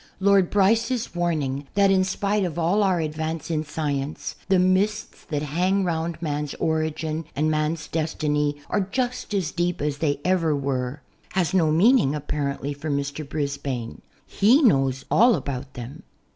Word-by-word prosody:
Lord 195 -2 +4
Bryce's 225 +4 +2
warning 150 -6 -1
that 200 -1 +4
in 190 -1 +4
spite 200 +2 0
of 175 -4 -3
all 175 +5 +2
our 190 -3 +2
advance 160 +1 -3
in 155 -1 0
science 145 -1 -3
"the 190 - +5
mists 190 +4 +1
that 150 -3 -3
hang 180 +7 +1
round 165 -2 -2
man's 150 -2 -2
origin 160 0 -1
and 155 +2 +1
man's 155 +1 -1
destiny 150 -2 -1
are 210 - 0
just 245 +6 -2
as 180 -5 -1
deep 175 0 -1
as 145 0 -2
they 145 -3 0
ever 170 -4 +2
were" 135 0 -3 0.3
has 185 -1 0
no 170 -5 +3
meaning 185 - +4
apparently 145 -1 -3
for 145 +2 -6
Mr. 140 +1 -3
Brisbane. 140 - -3 0.2
He 245 +10 +4
knows 135 - +3
all 235 +1 +6
about 135 -1 -5
them. 125 +7 -8
160 Hz, 155 wpm, -24 LUFS, 145-190 Hz, 0.3 s, all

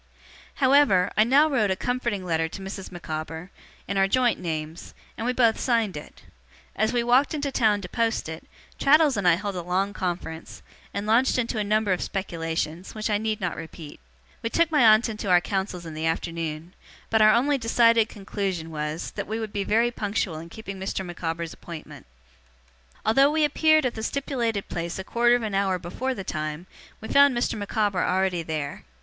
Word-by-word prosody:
However, 260 -9 +4
I 215 - +5
now 275 +7 +5
wrote 240 -9 +1
a 190 - +1
comforting 235 -3 -2
letter 165 -2 0
to 195 - -8
Mrs. 195 0 -7
Micawber, 160 0 -6 0.4
in 200 - -2
our 195 0 +4
joint 245 +3 +2
names, 160 -1 -5 0.2
and 225 - -4
we - - +2
both 235 -3 +3
signed 230 -6 +1
it. 150 - -10 0.5
As 220 +1 +1
we 240 -1 +1
walked 255 +6 +3
into 285 -2 -2
town 215 -5 +2
to 180 - -6
post 230 -1 -1
it, 160 0 -7 0.3
Traddles 295 -1 +5
and 200 -3 0
I 170 - +6
held 200 +2 -4
a 180 - -3
long 185 +3 -1
conference, 175 -4 -5 0.3
and 200 +1 -4
launched 230 +5 +3
into 230 -2 -1
a - - +1
number 210 -1 +1
of 180 - -3
speculations, 165 -2 -3
which 215 0 -2
I 205 - +2
need 220 0 -2
not 180 -4 -2
repeat. 160 -2 -9 0.4
We 230 - -2
took 335 +5 +2
my 300 - +3
aunt 220 0 +6
into 215 -3 -4
our 180 -1 +6
counsels 190 -2 -3
in 160 - -7
the 155 +1 -2
afternoon; 165 0 -3 0.4
but 220 -1 +4
our 215 0 +7
only 275 +4 +2
decided 230 -1 +4
conclusion 195 -5 -4
was, 150 +1 -4
that - - -5
we 220 +2 -3
would 220 -2 -5
be 200 - -1
very 230 +4 +2
punctual 205 -7 -2
in 165 +1 -10
keeping 195 -1 -8
Mr. 190 0 -3
Micawber's 170 -1 -4
appointment. 165 - -10 1.0
Although 270 +6 +5
we 310 0 +2
appeared 310 0 +3
at 250 - 0
the 220 - -6
stipulated 235 -4 -2
place 170 0 -4
a 190 - -4
quarter 240 +4 +3
of 245 - -1
an 215 -2 -3
hour 195 -1 +1
before 255 +10 -4
the 195 - -5
time, 155 0 -4 0.4
we 220 - -7
found 280 -1 +5
Mr. 240 - 0
Micawber 205 -2 0
already 185 -2 +1
there. 150 - -4
200 Hz, 195 wpm, -25 LUFS, 175-235 Hz, 1.0 s, our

